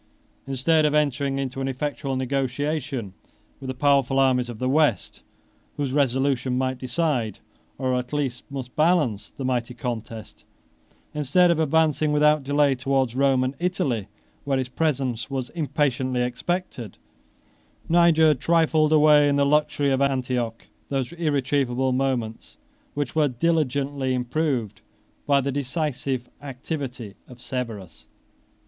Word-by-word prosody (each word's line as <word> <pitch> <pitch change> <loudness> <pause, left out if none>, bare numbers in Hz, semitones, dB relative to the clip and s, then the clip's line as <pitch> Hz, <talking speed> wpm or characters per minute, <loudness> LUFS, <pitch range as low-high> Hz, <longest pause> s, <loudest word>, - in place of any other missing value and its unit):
Instead 135 +4 +2
of 150 0 +2
entering 140 -2 +1
into 135 0 -3
an 135 - -1
effectual 135 0 -3
negotiation 135 -2 -2 0.5
with 135 - -8
the 130 - -4
powerful 140 -1 +2
armies 130 -2 +2
of 120 - -7
the 130 - -2
West, 140 - +1 0.6
whose 140 -3 -2
resolution 130 -2 +1
might 130 0 -1
decide, 125 - -1 0.4
or 130 -1 -1
at 125 -1 -2
least 135 -5 -2
must 130 -3 -7
balance, 150 - +1
the 135 - -7
mighty 125 -1 -1
contest; 115 -2 -6 0.7
instead 150 +5 +3
of 165 - 0
advancing 155 -1 +2
without 150 0 +3
delay 145 0 +2
towards 130 -1 0
Rome 135 -1 +3
and 130 +1 -1
Italy, 135 - -1 0.4
where 140 -1 0
his 130 -1 -2
presence 130 -6 -1
was 130 -3 -4
impatiently 135 -5 0
expected, 125 - -3 0.9
24 - - -26
Niger 165 -2 +5
trifled 155 +1 +2
away 150 -1 +6
in 140 - +2
the 140 0 +3
luxury 145 -1 +2
of 135 0 +1
Antioch 125 -4 -1 0.2
those 135 +2 -2
irretrievable 135 -5 0
moments 125 -4 -2 0.4
which 145 -3 -2
were 155 -2 +3
diligently 140 -2 0
improved 125 -5 -2 0.5
by 140 -1 +4
the 140 +1 -2
decisive 135 -2 -2
activity 130 -5 -6
of 125 -1 -13
Severus. 115 -10 -6
135 Hz, 130 wpm, -24 LUFS, 125-150 Hz, 0.9 s, away